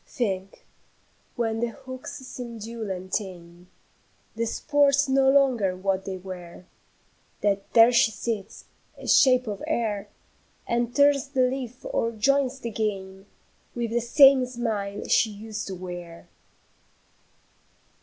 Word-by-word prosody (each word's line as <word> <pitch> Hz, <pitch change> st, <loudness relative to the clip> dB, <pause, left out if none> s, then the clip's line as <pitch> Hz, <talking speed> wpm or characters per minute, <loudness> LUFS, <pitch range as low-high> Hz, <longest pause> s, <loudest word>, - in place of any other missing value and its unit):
"Think, 195 Hz, -5 st, -4 dB, 0.7 s
when 225 Hz, -2 st, -1 dB
the 235 Hz, -, 0 dB
hooks 260 Hz, +2 st, -9 dB
seem 240 Hz, -2 st, -7 dB
dull 225 Hz, 0 st, -6 dB
and 185 Hz, 0 st, -6 dB
tame, 180 Hz, -3 st, -5 dB, 0.7 s
The 230 Hz, +1 st, -1 dB
sports 285 Hz, +2 st, +2 dB
no 265 Hz, 0 st, +3 dB
longer 255 Hz, -9 st, +3 dB
what 190 Hz, 0 st, -1 dB
they 190 Hz, -1 st, -4 dB
were, 180 Hz, -1 st, -10 dB, 0.8 s
That 200 Hz, -1 st, 0 dB
there 230 Hz, +1 st, +7 dB
she 235 Hz, -2 st, +4 dB
sits, 220 Hz, -2 st, -5 dB, 0.3 s
a -, -, -10 dB
shape 255 Hz, -1 st, +5 dB
of 205 Hz, -3 st, -5 dB
air, 210 Hz, -4 st, -2 dB, 0.6 s
And 240 Hz, 0 st, -1 dB
turns 285 Hz, -1 st, +4 dB
the 265 Hz, -2 st, +1 dB
leaf 255 Hz, -1 st, -3 dB
or 230 Hz, -, -1 dB
joins 270 Hz, +4 st, +1 dB
the 230 Hz, -, -4 dB
game 195 Hz, -3 st, -4 dB, 0.5 s
With 235 Hz, -2 st, -2 dB
the 240 Hz, +1 st, +1 dB
same 270 Hz, +2 st, +6 dB
smile 220 Hz, -5 st, -3 dB
she 225 Hz, -, +3 dB
used 215 Hz, +1 st, -7 dB
to 190 Hz, -, -5 dB
wear. 175 Hz, -2 st, -9 dB
225 Hz, 130 wpm, -25 LUFS, 195-255 Hz, 0.8 s, there